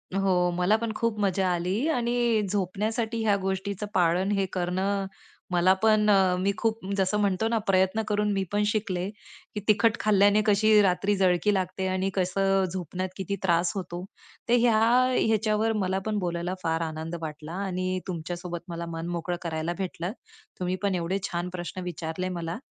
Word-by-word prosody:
हो, 185 Hz, -2 st, +2 dB
मला 180 Hz, +4 st, +3 dB
पण 230 Hz, 0 st, -3 dB
खूप 230 Hz, -2 st, -1 dB
मजा 195 Hz, -2 st, +1 dB
आली. 185 Hz, -, -1 dB
आणि 240 Hz, -4 st, +1 dB
झोपण्यासाठी 220 Hz, +4 st, -1 dB
ह्या 205 Hz, -2 st, +3 dB
गोष्टीचं 195 Hz, +1 st, -3 dB
पाळन 180 Hz, +2 st, +2 dB
हे 195 Hz, -1 st, +1 dB
करणं 190 Hz, +2 st, -1 dB, 0.5 s
मला 180 Hz, +1 st, +4 dB
पण 215 Hz, -1 st, +4 dB
अ, 190 Hz, -2 st, +4 dB
मी 195 Hz, +2 st, +2 dB
खूप 225 Hz, 0 st, 0 dB, 0.2 s
जसं 190 Hz, +2 st, +1 dB
म्हणतो 200 Hz, +1 st, +1 dB
ना, 230 Hz, -, +1 dB
प्रयत्न 190 Hz, +3 st, +3 dB
करून 210 Hz, 0 st, +1 dB
मी 195 Hz, -, 0 dB
पण 205 Hz, +1 st, +1 dB
शिकले 200 Hz, -3 st, -1 dB, 0.5 s
की 210 Hz, -, -1 dB
तिखट 215 Hz, +1 st, +4 dB
खाल्ल्याने 205 Hz, 0 st, +4 dB
कशी 215 Hz, +1 st, +5 dB
रात्री 195 Hz, +1 st, +2 dB
जळकी 190 Hz, +2 st, +3 dB
लागते 190 Hz, 0 st, -1 dB
आणि 185 Hz, +1 st, 0 dB
कसं 195 Hz, +1 st, +2 dB
झोपण्यात 185 Hz, +1 st, -4 dB
किती 195 Hz, +1 st, -2 dB
त्रास 170 Hz, -1 st, +2 dB
होतो. 180 Hz, -2 st, -5 dB, 0.5 s
तर -, -, +4 dB
ह्या 230 Hz, -2 st, +4 dB, 0.5 s
ह्याच्यावर 220 Hz, 0 st, +1 dB
मला 190 Hz, +1 st, 0 dB
पण 215 Hz, -1 st, -1 dB
बोलायला 175 Hz, 0 st, -2 dB
फार 165 Hz, 0 st, 0 dB
आनंद 160 Hz, +1 st, -4 dB
वाटला. 155 Hz, 0 st, -6 dB
आणि 185 Hz, 0 st, -2 dB
तुमच्यासोबत 175 Hz, 0 st, -5 dB
मला 170 Hz, 0 st, -4 dB
मन 165 Hz, +1 st, -4 dB
मोकळं 175 Hz, 0 st, -3 dB
करायला 165 Hz, 0 st, -2 dB
भेटलं. 185 Hz, -1 st, -3 dB, 0.5 s
तुम्ही 180 Hz, 0 st, -1 dB
पण 195 Hz, -2 st, +1 dB
एवढे 180 Hz, +3 st, -1 dB
छान 175 Hz, 0 st, -2 dB
प्रश्न 180 Hz, +1 st, -6 dB
विचारले 175 Hz, +1 st, -4 dB
मला 165 Hz, 0 st, -4 dB
190 Hz, 165 wpm, -27 LUFS, 180-210 Hz, 0.5 s, कशी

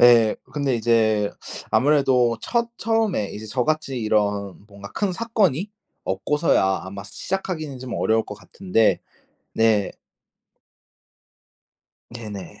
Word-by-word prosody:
예. 120 Hz, -3 st, +6 dB, 0.2 s
근데 140 Hz, -3 st, 0 dB
이제 110 Hz, -3 st, +2 dB, 0.4 s
아무래도 130 Hz, -5 st, +3 dB
첫 235 Hz, -1 st, 0 dB
처음에 225 Hz, -, 0 dB
이제 110 Hz, +1 st, -7 dB
저같이 135 Hz, +2 st, -1 dB
이런 105 Hz, -3 st, 0 dB
뭔가 100 Hz, -1 st, -11 dB
큰 200 Hz, -3 st, -1 dB
사건이 205 Hz, -, 0 dB, 0.3 s
없고서야 95 Hz, -, +1 dB
아마 100 Hz, +1 st, -7 dB
시작하기는 155 Hz, -, -4 dB
좀 125 Hz, -2 st, -6 dB
어려울 110 Hz, 0 st, +2 dB
것 105 Hz, -, -7 dB
같은데 115 Hz, -, +1 dB, 0.5 s
네. 110 Hz, -3 st, +3 dB, 2.2 s
네네. 105 Hz, -6 st, -8 dB
120 Hz, 230 characters per minute, -23 LUFS, 105-155 Hz, 2.2 s, 예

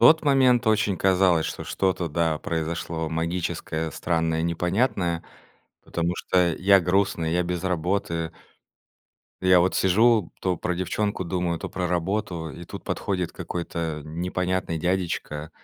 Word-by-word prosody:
тот 160 Hz, 0 st, +7 dB
момент 130 Hz, -4 st, +4 dB
очень 110 Hz, -3 st, +2 dB
казалось, 90 Hz, -3 st, +3 dB
что -, -, -5 dB
что-то 90 Hz, -3 st, -1 dB
да 80 Hz, 0 st, 0 dB
произошло 80 Hz, 0 st, -3 dB
магическое, 80 Hz, -1 st, -2 dB
странное, 80 Hz, 0 st, 0 dB
непонятное. 90 Hz, +1 st, 0 dB, 0.6 s
Потому 85 Hz, +1 st, -1 dB
что 90 Hz, -1 st, +2 dB
я 100 Hz, +1 st, +5 dB
грустный, 90 Hz, -3 st, +1 dB
я 90 Hz, +1 st, +2 dB
без 90 Hz, 0 st, -3 dB
работы. 85 Hz, -2 st, -1 dB, 1.1 s
И 95 Hz, -, -1 dB
я 90 Hz, -1 st, +7 dB
вот 90 Hz, +2 st, +2 dB
сижу, 105 Hz, +1 st, +3 dB
то 90 Hz, -2 st, +1 dB
про 90 Hz, -, -1 dB
девчонку 95 Hz, +2 st, -1 dB
думаю, 85 Hz, -1 st, -1 dB
то -, -, -5 dB
про 90 Hz, -1 st, -2 dB
работу. 90 Hz, -1 st, -2 dB
И 85 Hz, -, -9 dB
тут -, -, -9 dB
подходит 90 Hz, -3 st, -2 dB
какой-то 85 Hz, -3 st, -4 dB
н 80 Hz, +2 st, -5 dB
непонятный 90 Hz, -1 st, -1 dB
дядечка. 85 Hz, -3 st, -2 dB
90 Hz, 140 wpm, -25 LUFS, 85-95 Hz, 1.1 s, тот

